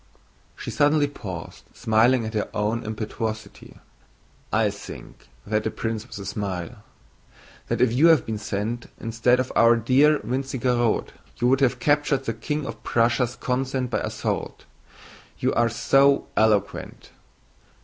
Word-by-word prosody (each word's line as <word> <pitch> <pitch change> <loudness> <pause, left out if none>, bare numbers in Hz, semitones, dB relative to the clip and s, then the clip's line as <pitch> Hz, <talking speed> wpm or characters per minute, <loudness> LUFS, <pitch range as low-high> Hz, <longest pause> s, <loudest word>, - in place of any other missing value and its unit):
She - - -6
suddenly 145 0 +3
paused, 95 -12 -8
smiling 115 +2 +3
at 110 - -5
her 105 - -1
own 110 +3 0
impetuosity. 110 0 -5 0.7
"I - - +2
think," - - -11 0.2
said 105 +1 +1
the 110 - -1
prince 115 +1 -4
with - - -9
a 100 - -7
smile, 100 +2 -4 0.9
"that - - -1
if 125 -2 +3
you 145 +7 +5
had 160 -7 +5
been 110 -2 -3
sent 110 +3 -3
instead 115 +2 +1
of 130 - -2
our 115 0 +6
dear 135 +6 +4
Wintzingerode 125 -3 0 0.2
you 120 - +1
would 135 +1 +3
have 130 -1 +3
captured 145 0 +1
the 115 - -1
King 150 +6 -3
of - - -7
Prussia's 120 +1 +1
consent 130 0 -2
by - - +1
assault. - - -4 0.7
You - - 0
are 120 0 +2
so 135 +4 +3
eloquent. 105 -2 0
120 Hz, 140 wpm, -24 LUFS, 110-130 Hz, 0.9 s, our